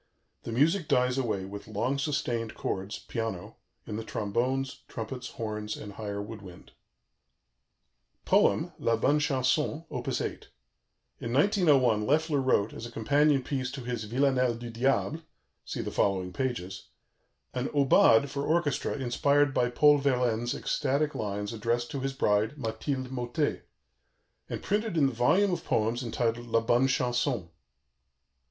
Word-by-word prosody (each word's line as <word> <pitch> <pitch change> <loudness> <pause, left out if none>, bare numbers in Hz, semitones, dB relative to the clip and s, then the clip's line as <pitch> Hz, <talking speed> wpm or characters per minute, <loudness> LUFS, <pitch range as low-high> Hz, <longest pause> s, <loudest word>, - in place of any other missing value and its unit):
The 115 - -4
music 155 - +2
dies 125 +1 +2
away 105 -7 -1
with 100 +2 -8
long 120 +6 -1
sustained 125 -6 -2
chords, 95 +2 -3
piano, 110 -6 -5 0.3
in 105 - -5
the 110 - -4
trombones, 125 +6 -2
trumpets, 125 +2 -6
horns, 105 -2 -4
and 105 -1 -8
higher 100 -1 -5
wood 105 +1 -7
wind. 90 -3 -13 1.5
"POEM" - - +3
["LA 115 - +2
BONNE 145 +6 +2
CHANSON"]: 145 +3 0
Op. - - -5
8 - - -3 0.7
In 115 - -4
1901 140 - +3
Loeffler 150 0 +2
wrote, 115 -5 +2
as 115 - -6
a - - -12
companion 140 +4 +2
piece 130 -1 -2
to 135 +1 -7
his 120 -3 -4
Villanelle 125 +1 +2
du 120 0 -7
Diable 135 +6 0 0.4
(see - - -4
the - - -4
following 95 -2 0
pages), 95 -8 -3 0.7
an 125 +1 -1
"aubade" 140 -3 +5
for 140 +1 -4
orchestra 155 -3 0
inspired 140 +2 +2
by 125 -1 +2
Paul 145 +4 +5
Verlaine's 125 -4 +1
ecstatic 145 +2 0
lines 105 0 -3
addressed 115 +2 -1
to 140 - -3
his 135 +1 -2
bride, 110 0 +1
Mathilde 130 +2 -3
Mauté, 120 -2 -1 0.9
and - - -5
printed 210 -2 -1
in 145 - +5
the 135 - +1
volume 185 - +3
of - - -3
poems 115 +3 0
entitled 120 0 -2
La 115 0 +2
Bonne 120 +3 +3
Chanson. 125 - 0
125 Hz, 145 wpm, -29 LUFS, 110-140 Hz, 1.5 s, aubade